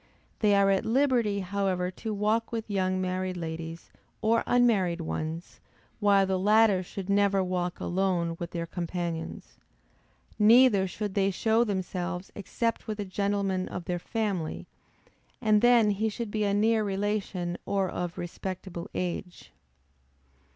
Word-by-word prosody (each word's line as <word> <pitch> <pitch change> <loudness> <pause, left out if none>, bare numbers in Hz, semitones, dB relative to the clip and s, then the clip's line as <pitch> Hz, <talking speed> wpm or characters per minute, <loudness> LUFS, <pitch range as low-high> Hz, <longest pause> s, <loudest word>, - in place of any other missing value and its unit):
They 210 -2 +4
are 200 0 +4
at 195 - +2
liberty 235 -5 +2
however 185 -1 -1
to 220 +4 -6
walk 215 +2 0
with 225 -2 -4
young 185 -1 0
married 185 0 -2
ladies 165 0 -6 0.3
or 225 +1 +2
unmarried 200 -9 +3
ones, 160 +1 -5 0.4
while 200 -2 +4
the 190 -1 0
latter 210 -1 +4
should 185 +1 -7
never 200 -1 +3
walk 180 -1 -2
alone 175 -2 0
with 170 - -4
their 170 -1 -4
companions. 170 -1 -5 0.8
Neither 215 -2 +6
should 205 +2 -4
they 195 -1 +2
show 220 +4 +2
themselves 185 -3 -3
except 230 +4 -3
with 215 -1 -4
a 205 - -2
gentleman 195 -1 -1
of 180 - -6
their 175 -1 -2
family, 195 -6 -3 0.7
and 215 -2 +3
then 235 -3 +5
he 215 +2 0
should 220 0 -5
be 215 -1 0
a 200 - +1
near 220 +1 +3
relation 195 -3 -2
or 195 -1 +1
of 175 -1 -4
respectable 180 0 -6
age. 180 0 -4
195 Hz, 140 wpm, -28 LUFS, 180-210 Hz, 0.8 s, Neither